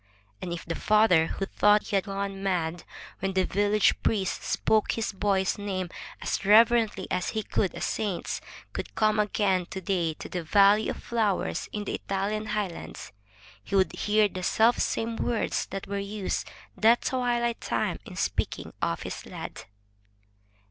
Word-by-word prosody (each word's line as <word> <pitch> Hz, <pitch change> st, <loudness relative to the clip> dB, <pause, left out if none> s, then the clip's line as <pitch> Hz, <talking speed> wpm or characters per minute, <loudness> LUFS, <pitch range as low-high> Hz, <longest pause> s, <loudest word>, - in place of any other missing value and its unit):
And 180 Hz, -, -4 dB
if 170 Hz, -, -5 dB
the 165 Hz, -, -2 dB
father 210 Hz, -5 st, +4 dB
who 195 Hz, -, -3 dB
thought 210 Hz, +1 st, +4 dB
he 205 Hz, -, 0 dB
had 195 Hz, -, +2 dB
gone 195 Hz, 0 st, -4 dB
mad 175 Hz, -3 st, -1 dB, 0.3 s
when 195 Hz, 0 st, -2 dB
the 190 Hz, -1 st, +2 dB
village 205 Hz, +1 st, +2 dB
priest 195 Hz, -4 st, 0 dB
spoke 215 Hz, -1 st, +1 dB
his 225 Hz, -, -2 dB
boy's 195 Hz, -1 st, 0 dB
name 190 Hz, -3 st, -3 dB, 0.3 s
as -, -, -2 dB
reverently 220 Hz, -1 st, +5 dB
as 180 Hz, -1 st, 0 dB
he 215 Hz, -, -1 dB
would 190 Hz, -, +1 dB
a -, -, -7 dB
saint's, 205 Hz, -5 st, -2 dB, 0.3 s
could -, -, -6 dB
come 215 Hz, 0 st, +2 dB
again 195 Hz, -4 st, +1 dB
to 190 Hz, -, -5 dB
day 170 Hz, -3 st, -1 dB
to -, -, -8 dB
the 180 Hz, -, -3 dB
valley 200 Hz, +5 st, +4 dB
of -, -, -5 dB
flowers 220 Hz, -5 st, -1 dB
in 210 Hz, -, -3 dB
the -, -, -4 dB
Italian 205 Hz, +2 st, -2 dB
highlands, 200 Hz, -, -4 dB, 0.5 s
he 200 Hz, -, -3 dB
would 190 Hz, -1 st, +3 dB
hear 210 Hz, 0 st, +3 dB
the 185 Hz, -2 st, -6 dB
selfsame 225 Hz, +2 st, +2 dB
words 235 Hz, -2 st, -1 dB
that 195 Hz, -1 st, -5 dB
were 200 Hz, 0 st, -3 dB
used 200 Hz, 0 st, -3 dB, 0.3 s
that 230 Hz, +2 st, +4 dB
twilight 240 Hz, -2 st, 0 dB
time -, -, -1 dB
in -, -, -10 dB
speaking -, -, -2 dB
of -, -, -1 dB
his -, -, -6 dB
lad. -, -, -7 dB
200 Hz, 160 wpm, -27 LUFS, 190-215 Hz, 0.5 s, reverently